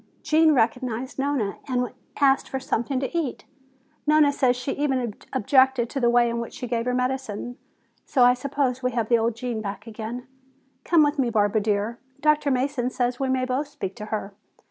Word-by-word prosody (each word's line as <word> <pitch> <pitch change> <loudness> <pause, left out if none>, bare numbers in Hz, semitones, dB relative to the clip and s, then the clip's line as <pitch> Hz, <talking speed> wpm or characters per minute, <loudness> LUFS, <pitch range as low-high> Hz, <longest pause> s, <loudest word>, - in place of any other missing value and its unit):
"Gene 315 0 +4
recognized 250 +1 -1
Nona 270 -8 -1
and 250 -2 -1 0.3
asked 275 -1 +3
for 265 - -3
something 260 0 -1
to 275 - -4
eat. 310 -7 -2 0.6
Nona 300 -1 +5
says 255 -3 +2
she 250 +2 -3
even 265 -6 -1 0.2
objected 260 0 +3
to 275 - -2
the 240 -2 +3
way 240 0 +4
in 235 0 -2
which 235 - -6
she - - -5
gave 235 -1 -1
her 250 - 0
medicine, 250 -2 -2 0.5
so 255 - +2
I 245 0 +7
suppose 260 0 -1
we 250 -1 -1
have 230 -3 -1
the 235 -1 +4
old 225 0 0
Gene 230 -1 -3
back 200 0 -6
again. 230 +2 -6 0.6
Come 335 -3 +4
with 290 0 0
me, 250 -3 +2
Barbara 215 -1 +2
dear, 210 +2 -1 0.2
Dr. 300 -1 +2
Mason 260 -1 0
says 245 -1 -1
we 270 -1 0
may 260 -1 +1
both 260 +3 -1
speak 195 -9 -6
to 210 - -6
her. 210 -2 -4
250 Hz, 190 wpm, -24 LUFS, 230-270 Hz, 0.6 s, I